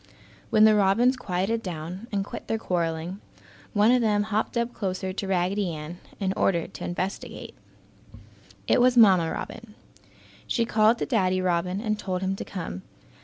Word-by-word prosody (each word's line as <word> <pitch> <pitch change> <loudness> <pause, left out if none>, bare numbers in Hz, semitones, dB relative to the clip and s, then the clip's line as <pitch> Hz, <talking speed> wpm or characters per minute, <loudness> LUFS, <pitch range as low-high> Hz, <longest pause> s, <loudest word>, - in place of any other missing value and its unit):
When 215 - +5
the 215 0 +7
robins 210 +6 +3
quieted 210 -1 -1
down 180 +3 -6
and 200 -2 -1
quit - - -8
their 225 - 0
quarreling, 170 -1 -2 0.5
one 210 +2 +4
of 250 0 +4
them 210 -2 +2
hopped 215 +2 -1
up 235 +1 -1
closer 185 -2 -3
to 195 0 -4
Raggedy 190 +1 0
Ann 155 +3 -8 0.2
in 190 -2 0
order 170 -4 +1
to - - -10
investigate. 185 +2 -5 1.1
It - - +4
was 250 0 +4
Mamma 185 -7 +6
Robin. 220 -1 -7 0.7
She 235 - +1
called 220 +1 +3
to - - -2
Daddy 185 -7 +1
Robin 180 +1 0
and 215 -1 -2
told 185 -2 -3
him 190 +1 0
to - - -4
come. 165 - -6
195 Hz, 165 wpm, -26 LUFS, 180-220 Hz, 1.1 s, the